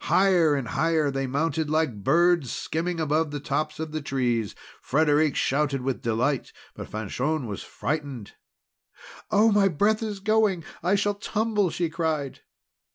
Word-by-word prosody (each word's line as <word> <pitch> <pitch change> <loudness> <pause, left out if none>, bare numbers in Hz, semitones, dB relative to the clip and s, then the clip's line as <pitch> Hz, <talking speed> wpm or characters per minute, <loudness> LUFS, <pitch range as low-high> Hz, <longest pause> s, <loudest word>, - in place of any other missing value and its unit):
Higher 180 -6 +4
and 135 -4 -3
higher 160 -3 +1
they 135 0 -2
mounted 160 +3 -1
like 150 -10 0
birds, 170 - +3
skimming 170 +2 -3
above 155 0 +1
the 145 0 -4
tops 150 +3 -2
of 160 -1 -4
the 155 0 -3
trees. 120 -6 -1 0.3
Frederic 150 +1 +2
shouted 140 -1 0
with 130 0 -2
delight, 120 +4 0 0.2
but - - -9
Fanchon 125 +7 -2
was 105 -3 -5
frightened. 140 -8 -4 1.0
"Oh, 220 +1 +4
my 200 -1 +4
breath 205 +6 +1
is 210 -3 -4
going! 210 -4 +2 0.2
I 180 +4 +2
shall 205 +1 +1
tumble!" 210 -1 0
she 170 +1 -1
cried. 160 -4 -2
155 Hz, 150 wpm, -25 LUFS, 135-180 Hz, 1.0 s, Higher